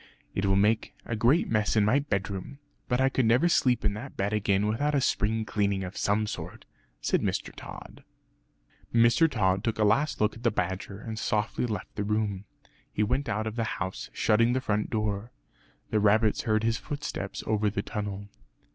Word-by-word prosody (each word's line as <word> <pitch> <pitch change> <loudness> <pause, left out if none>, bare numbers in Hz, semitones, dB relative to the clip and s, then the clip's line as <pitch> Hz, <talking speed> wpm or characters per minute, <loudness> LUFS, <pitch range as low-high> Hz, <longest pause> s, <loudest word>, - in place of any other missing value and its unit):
"It 100 +1 0
will 95 - +3
make 105 +3 +2
a 115 - -2
great 125 +10 +3
mess 110 -1 +1
in 105 -2 +4
my 120 +7 +4
bedroom; 100 -1 -3 0.3
but 125 - +1
I 130 - +4
could 130 -3 +1
never 125 +9 +4
sleep 125 -9 +2
in 105 - +2
that 120 +7 -8
bed 100 +2 0
again 100 -1 +1
without 145 +8 0
a - - +4
spring 110 -3 0
cleaning 100 -2 0
of 90 +1 -6
some 105 +1 +1
sort," 105 - -7 0.4
said - - +1
Mr. - - -2
Tod. - - -10 0.9
Mr. 115 +8 +5
Tod 95 -6 +1
took 115 -2 -1
a 110 - +2
last 115 +9 +2
look 105 0 +2
at 115 - -11
the 120 - +3
badger 95 -1 -3
and 110 0 -6
softly 110 +3 0
left 105 -5 -5
the 105 - -1
room. 105 -2 -1 0.5
He 105 - 0
went 125 +5 0
out 110 0 -1
of 110 0 -4
the 115 - +1
house, 95 -1 -4
shutting 115 +3 +3
the 130 - +1
front 105 -4 -1
door. 105 0 -2 0.6
The 110 - +3
rabbits 105 +1 +3
heard 110 -1 +2
his 115 0 +1
footsteps 145 -9 -5
over 110 -1 +1
the 100 0 -3
tunnel. 100 -1 -5
110 Hz, 190 wpm, -28 LUFS, 100-115 Hz, 0.9 s, Mr